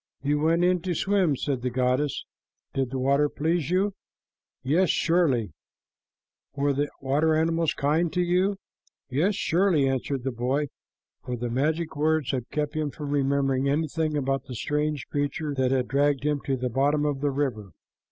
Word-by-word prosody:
"You 145 +1 +1
went 165 +3 +2
in 180 -1 +3
to 180 0 -2
swim," 190 -5 +2
said 135 -1 -2
the 125 - -1
goddess. 130 +3 0 0.5
"Did 135 -2 -1
the 135 - -4
water 140 +3 +2
please 160 +1 -1
you?" 195 +3 +1 0.7
"Yes, 165 +7 +2
surely." 150 - +2 1.0
"Were 140 0 +1
the 145 +1 0
water 150 +4 +2
animals 165 0 +1
kind 155 +4 +1
to 180 - +1
you?" 185 +3 +1 0.5
"Yes, 175 +10 +2
surely," 175 -6 +2
answered 135 0 -2
the 135 - -1
boy, 130 +5 -1 0.5
for 125 - -3
the 120 0 -4
magic 155 +6 0
words 155 -1 +1
had 125 -3 -3
kept 150 -1 -2
him 155 -1 -1
from 145 0 -6
remembering 140 -1 +1
anything 155 +1 0
about 135 -1 -1
the 130 -2 -7
strange 150 +2 -1
creature 145 +1 -2
that 130 -2 +1
had 130 -1 +1
dragged 140 0 +1
him 150 -1 0
to 135 -1 0
the 125 0 -2
bottom 145 +4 +2
of 145 -2 -1
the 145 - +2
river. 130 -8 -2
145 Hz, 170 wpm, -26 LUFS, 135-160 Hz, 1.0 s, in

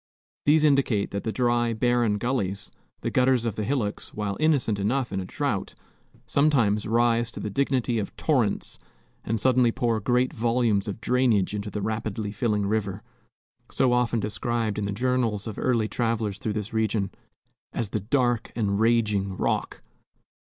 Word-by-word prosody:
These 155 +1 +5
indicate 135 -8 +2
that 100 - -4
the 110 - 0
dry, 120 -1 +1
barren 120 -2 +2
gullies, 100 -5 -2 0.3
the - - -2
gutters 125 -2 +3
of 115 -3 -1
the 110 - -2
hillocks, 115 -4 -2
while 105 -2 -2
innocent 140 -9 +2
enough 120 +4 0
in 95 - -1
a 95 - -4
drought, 140 - -2 0.5
sometimes 120 -8 +2
rise 115 +1 +2
to - - -8
the 105 - -4
dignity 125 -1 0
of 100 - -5
torrents 125 -10 0 0.4
and 115 0 -1
suddenly 125 0 +4
pour 115 -1 0
great 125 +4 +1
volumes 115 -3 +1
of 105 +2 -5
drainage 115 -5 +2
into 105 0 -3
the 105 -1 -4
rapidly 110 -1 -3
filling 105 -1 0
river, 100 -2 -2 0.7
so 130 -2 +2
often 125 -1 +1
described 110 0 -2
in 105 - -2
the 100 - -2
journals 115 -2 0
of 110 -3 -6
early 115 -4 +1
travelers 110 -4 -1
through 110 - -2
this 105 +1 -4
region, 110 -3 0 0.6
as 115 -4 -3
"the 110 - -1
dark 120 +2 0
and 100 -3 0
raging 105 -4 +1
Rock." - - -2
115 Hz, 160 wpm, -26 LUFS, 105-125 Hz, 0.7 s, These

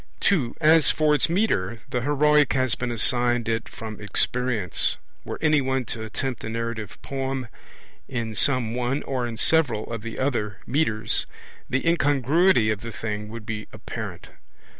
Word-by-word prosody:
(2) 145 - +2
As 160 -2 +6
for 155 -1 +3
its 150 - +2
metre, 115 - 0
the 125 -2 0
heroic 150 +2 +3
has 130 -2 +1
been 125 - -2
assigned 120 0 +2
it 115 0 -1
from 110 -1 -8
experience; 110 -1 0 0.3
were - - -5
any 150 -2 +4
one 130 -1 -1
to 110 0 -5
attempt 120 +3 -4
a - - -4
narrative 115 -2 -4
poem 135 -2 -3 0.6
in 115 -4 -3
some 120 0 +1
one, 125 +3 -1
or 125 -3 -2
in 115 -1 -6
several, 130 -7 +2
of 115 - -4
the 115 +1 -7
other 110 -7 -1
metres, 115 -6 0 0.4
the 135 +5 0
incongruity 145 - +3
of 105 -1 -3
the 115 - -6
thing 105 -1 -4
would 115 -1 -8
be 105 0 -5
apparent. - - -7
125 Hz, 160 wpm, -25 LUFS, 110-140 Hz, 0.6 s, As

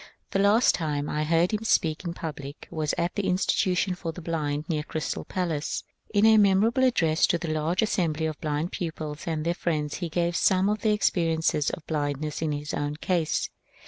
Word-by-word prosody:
The 195 - +1
last 205 +5 +5
time 150 -3 -2
I 150 0 -1
heard 165 +5 +2
him 215 +1 -1
speak 165 -6 +1
in 170 -1 -4
public 145 -4 -7
was 155 -2 -1
at 170 +2 0
the 205 - -1
institution 185 0 +1
for 180 -2 -4
the 160 - -9
blind 155 -3 -2
near 155 -3 0
the - - -12
Crys 155 - -2
tal - - -7
Palace. 165 -5 -2 0.3
In 205 0 +4
a 220 0 +7
memorable 210 +5 +4
address 165 -11 +3
to 170 - +2
the 170 -1 -5
large 160 +6 +1
assembly 165 -7 0
of 155 -2 -4
blind 150 +3 -1
pupils 155 -3 -5
and 160 -2 -2
their 170 - +2
friends 155 -4 -2
he 175 -2 -4
gave 170 +1 0
some 190 +2 +3
of 210 0 -1
the 220 - +2
experi 165 -5 +1
ences 155 -2 +1
of 160 - -7
blindness 150 0 -2
in 160 -2 0
his 145 0 -4
own 145 0 -2
case. 165 0 0
165 Hz, 210 wpm, -26 LUFS, 155-185 Hz, 0.3 s, a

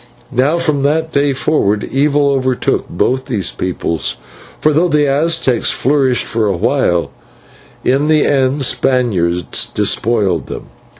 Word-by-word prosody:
"Now 135 +6 +1
from 155 -4 0
that 160 +3 0
day 140 -1 +1
forward 120 -7 0
evil 145 +1 +1
overtook 130 -2 -1
both 130 +9 -1
these 100 -8 -1
peoples, 85 -3 -3 0.4
for 155 - +2
though 165 +5 +2
the 150 -3 +2
Aztecs 140 -4 +1
flourished 130 -2 +1
for 110 -2 -1
a 100 - -1
while, 85 -1 0 0.7
in 140 +3 +2
the 155 -1 +3
end 135 0 +1
Spaniards 95 -12 0
despoiled 100 - 0
them. - - -8
130 Hz, 130 wpm, -15 LUFS, 110-145 Hz, 0.7 s, the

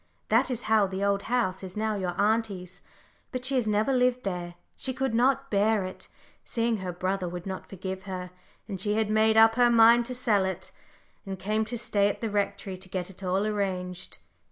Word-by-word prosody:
That 230 +5 +3
is 245 -2 -3
how 215 -2 +3
the 190 +1 -3
Old 200 0 +2
House 225 -7 0
is 190 +1 -8
now 220 0 0
your 180 -3 -3
auntie's, 205 -4 0 0.5
but 255 -1 -3
she 270 - +1
has 250 -4 +1
never 215 +5 +2
lived 250 0 +2
there. 175 -3 -4 0.2
She 260 -2 -3
could 265 -2 -1
not 270 +3 +2
bear 210 0 +2
it, 185 - -8 0.4
seeing 230 -1 0
her 185 -2 -4
brother 185 +1 -2
would 175 0 -7
not 190 -1 -6
forgive 190 0 -6
her, 180 -2 -5 0.4
and 195 -4 -4
she 210 +1 +1
had 215 -1 0
made 220 +1 +3
up 225 0 +7
her 245 +1 +4
mind 235 0 +6
to 250 +1 -5
sell 220 -6 +2
it, 190 0 -4 0.5
and 195 -2 -5
came 215 +4 -1
to 240 +2 -4
stay 205 -3 +2
at - - -4
the 225 -2 -3
Rectory 200 -2 -2
to 185 0 -10
get 185 0 -3
it 190 - -12
all 190 +2 0
arranged. 185 -3 -3
205 Hz, 205 wpm, -27 LUFS, 190-230 Hz, 0.5 s, up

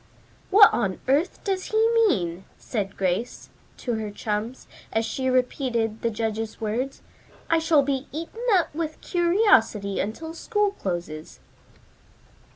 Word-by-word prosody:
"What 410 +1 +8
on 200 -6 -1
earth 290 +7 +1
does 380 -2 -1
he 435 - -2 0.2
mean?" 190 - +1
said 200 -4 -4
Grace 195 +6 -2 0.3
to 245 - -3
her 215 -1 -4
chums, 210 +4 -4 0.3
as 225 0 0
she 260 +2 -2
repeated 250 -3 0
the 230 - +1
judge's 220 0 -3
words. 235 +5 -3 0.5
"I 330 - +5
shall 320 -3 +4
be 275 0 -2
eaten 330 +9 -6
up 355 -5 +2
with 315 0 -4
curiosity 345 - +2
until 320 +11 -4
school 415 +3 0
closes." 175 - -5
250 Hz, 130 wpm, -25 LUFS, 210-330 Hz, 0.5 s, What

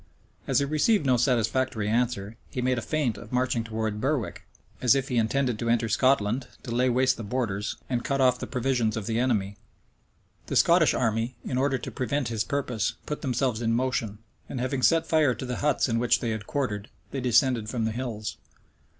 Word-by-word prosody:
As - - +2
he 140 - +3
received 155 +5 +2
no 130 -2 +4
satisfactory 120 -2 +1
answer, 115 -2 0
he - - -5
made 125 0 +1
a - - -5
feint 125 +1 -1
of 115 - -12
marching 125 -2 +1
towards 110 -1 -3
Berwick; 130 0 -2 0.3
as 125 +1 +5
if 135 +1 -1
he 125 - 0
intended 120 +1 +1
to 115 - -1
enter 115 -1 +2
Scotland, 120 +1 +2 0.2
to 120 - -5
lay 125 +2 +2
waste 130 +1 +2
the 115 - -6
borders, 105 -3 -2
and 120 -2 -1
cut 140 -2 -1
off 125 -2 +4
the - - -5
provisions 125 -4 0
of 110 - -4
the 115 +1 -1
enemy. 105 -6 0 0.9
The - - -3
Scottish - - +5
army, 115 +2 0
in - - -2
order 135 +1 +1
to 125 - -7
prevent 135 -1 -1
his 110 -2 -1
purpose, 125 -4 -1
put 150 - -4
themselves 125 -3 0
in 115 -1 +1
motion; 120 -4 -1 0.3
and 130 - -4
having 130 +1 -1
set 165 +5 +4
fire 155 -6 +3
to - - -6
the 125 -1 -3
huts 145 -2 +1
in 115 -2 0
which 120 0 +3
they 115 - -2
had 110 -2 -5
quartered, 115 -7 -2 0.2
they 135 - -3
descended 120 -2 +2
from 115 -2 -1
the 110 - 0
hills. 110 -3 -4
125 Hz, 200 wpm, -27 LUFS, 115-130 Hz, 0.9 s, as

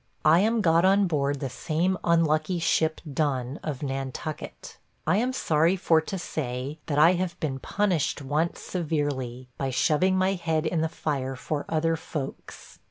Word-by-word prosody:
I 160 +2 +6
am 220 +3 +2
got 165 -2 +4
on 195 +1 +5
board 145 -4 0
the 135 - -2
same 170 +6 0
unlucky 165 +1 +2
ship 160 -1 +1
Done, 135 -3 -1
of 150 -2 -4
Nantucket. 135 +2 -5 0.3
I 160 +5 +3
am 245 +4 +1
sorry 165 -7 +2
for 165 -3 +3
to 190 +5 -5
say, 140 -3 -4
that 145 - -1
I 165 +4 +7
have 180 -1 -2
been 135 -4 -2
punished 185 -3 0
once 150 +4 -1
severely, 145 -7 -2
by 135 - -1
shoving 170 +8 +2
my 185 +1 +2
head 165 -3 -1
in 160 0 0
the 160 - 0
fire 135 -4 -3
for 145 +3 -3
other 165 +1 +1
folks. 150 -3 -7
155 Hz, 165 wpm, -26 LUFS, 140-175 Hz, 0.3 s, I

